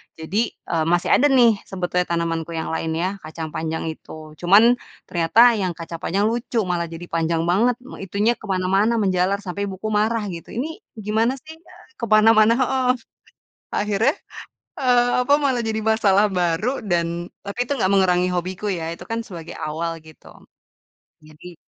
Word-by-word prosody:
Jadi, 190 Hz, +9 st, -2 dB, 0.2 s
eee, 160 Hz, -2 st, +1 dB
masih 175 Hz, +1 st, +1 dB
ada 290 Hz, -, +5 dB
nih 240 Hz, -6 st, +4 dB
sebetulnya 180 Hz, -1 st, -1 dB
tanamanku 165 Hz, -1 st, -2 dB
yang 160 Hz, -, -3 dB
lain 160 Hz, 0 st, -2 dB
ya, 185 Hz, +4 st, -2 dB
kacang 160 Hz, 0 st, -6 dB
panjang 160 Hz, +1 st, -3 dB
itu. 160 Hz, -, -13 dB, 0.3 s
Cuman 195 Hz, +5 st, +6 dB, 0.4 s
ternyata 195 Hz, +8 st, +4 dB
yang 185 Hz, -3 st, -2 dB
kaca 165 Hz, 0 st, -7 dB
panjang 195 Hz, +5 st, -1 dB
lucu 235 Hz, -1 st, -1 dB
malah 175 Hz, -2 st, -2 dB
jadi 165 Hz, +1 st, -9 dB
panjang 165 Hz, 0 st, 0 dB
banget 210 Hz, +9 st, +2 dB
me 265 Hz, -, -11 dB
itunya 200 Hz, +4 st, 0 dB
ke -, -, -11 dB
mana-mana 195 Hz, +4 st, +1 dB
menjalar 190 Hz, +1 st, +1 dB
sampai 200 Hz, +2 st, -3 dB
ibuku 195 Hz, +2 st, -5 dB
marah 220 Hz, +1 st, 0 dB
gitu, 170 Hz, -1 st, -8 dB
"Ini 315 Hz, -, -4 dB, 0.3 s
gimana 225 Hz, +4 st, +1 dB
sih? 315 Hz, +1 st, -11 dB
Eee, 360 Hz, +2 st, -18 dB
ke 235 Hz, -, -2 dB
mana-mana," 215 Hz, +1 st, +6 dB
heeh. 260 Hz, 0 st, +1 dB, 0.9 s
Akhirnya, 210 Hz, +7 st, +1 dB, 0.6 s
eee, 245 Hz, -2 st, +3 dB, 0.2 s
apa 285 Hz, -, +5 dB
malah 265 Hz, -3 st, +1 dB
jadi 220 Hz, 0 st, -1 dB
masalah 210 Hz, -1 st, +3 dB
baru 175 Hz, +6 st, +1 dB, 0.2 s
dan 175 Hz, -3 st, +1 dB, 0.4 s
tapi 200 Hz, +3 st, -7 dB
itu 285 Hz, -, -2 dB
nggak 205 Hz, -8 st, 0 dB
mengurangi 180 Hz, -2 st, +3 dB
hobiku 180 Hz, +3 st, -3 dB
ya, 165 Hz, -, -4 dB
itu 170 Hz, -, -12 dB
kan 230 Hz, 0 st, -3 dB
sebagai 170 Hz, -6 st, -9 dB
awal 165 Hz, +2 st, -3 dB
gitu. 155 Hz, -, -17 dB, 1.0 s
Jadi 155 Hz, +3 st, -13 dB
195 Hz, 165 wpm, -22 LUFS, 170-225 Hz, 1.0 s, Cuman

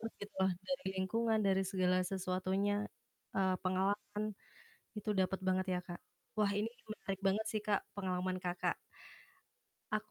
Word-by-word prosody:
bahagia 225 Hz, -2 st, -5 dB
banget 190 Hz, -2 st, +3 dB
gitu. -, -, -23 dB
Dari 275 Hz, -3 st, -1 dB
lingkungan, 220 Hz, +4 st, +2 dB
dari 190 Hz, 0 st, +4 dB
segala 185 Hz, -2 st, +3 dB
sesuatunya, 190 Hz, +2 st, +1 dB, 0.6 s
eee, 190 Hz, -1 st, +4 dB
pengalaman 200 Hz, +3 st, +1 dB, 0.7 s
itu 210 Hz, +1 st, -3 dB
dapet 190 Hz, +1 st, +2 dB
banget 185 Hz, 0 st, +3 dB
ya, 180 Hz, -, +1 dB
Kak. 175 Hz, 0 st, -5 dB, 0.4 s
Wah, 210 Hz, -2 st, +4 dB
ini 220 Hz, -, +1 dB, 0.2 s
menarik 195 Hz, -3 st, -3 dB
banget 215 Hz, +3 st, +2 dB
sih, 215 Hz, -, +1 dB
Kak, 205 Hz, -2 st, +4 dB
pengalaman 185 Hz, -1 st, 0 dB
Kakak. 180 Hz, -1 st, 0 dB, 1.2 s
Aku -, -, 0 dB
190 Hz, 145 wpm, -36 LUFS, 185-205 Hz, 1.2 s, dari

